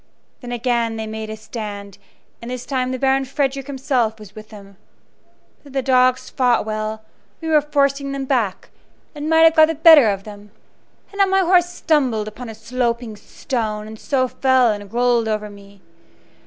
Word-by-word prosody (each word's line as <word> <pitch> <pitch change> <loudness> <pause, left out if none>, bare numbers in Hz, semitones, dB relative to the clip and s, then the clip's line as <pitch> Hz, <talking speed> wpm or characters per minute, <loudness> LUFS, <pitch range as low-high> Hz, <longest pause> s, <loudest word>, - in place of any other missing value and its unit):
Then 245 -2 -9
again 235 -1 -1
they 220 0 -4
made 220 0 -6
a 220 - -6
stand, 205 -3 -8 0.4
and 235 - -8
this 250 -1 -6
time 255 -2 -2
the 255 - -3
Baron 270 +1 +1
Frederick 275 0 -2
himself 255 -5 -1
was 210 -3 -13
with 215 0 -12
them. 200 -2 -14 0.9
But 280 -2 -15
though - - -4
the 265 - 0
dogs 255 -1 +2
fought 245 -4 +1
well, 215 0 -4 0.4
we 325 - -5
were 305 -1 +4
forcing 280 -1 0
them 275 -1 -4
back, 230 -8 -2 0.4
and 300 0 -5
might 320 0 +4
have 325 0 +6
got 315 0 +7
the 325 - -2
better 310 -6 +7
of 195 -1 -3
them, 205 0 -12 0.6
had 400 - -13
not 395 -1 +3
my 385 0 +3
horse 355 -1 +3
stumbled 265 -11 0
upon 230 +3 -8
a 220 - -8
sloping 235 0 -3
stone, 215 0 -4
and 220 0 -10
so 260 -2 0
fell 260 -2 +2
and 205 -1 -7
rolled 240 -1 +1
over 215 -1 -2
upon 210 - -10
me. 200 -1 -16
245 Hz, 190 wpm, -20 LUFS, 215-275 Hz, 0.9 s, got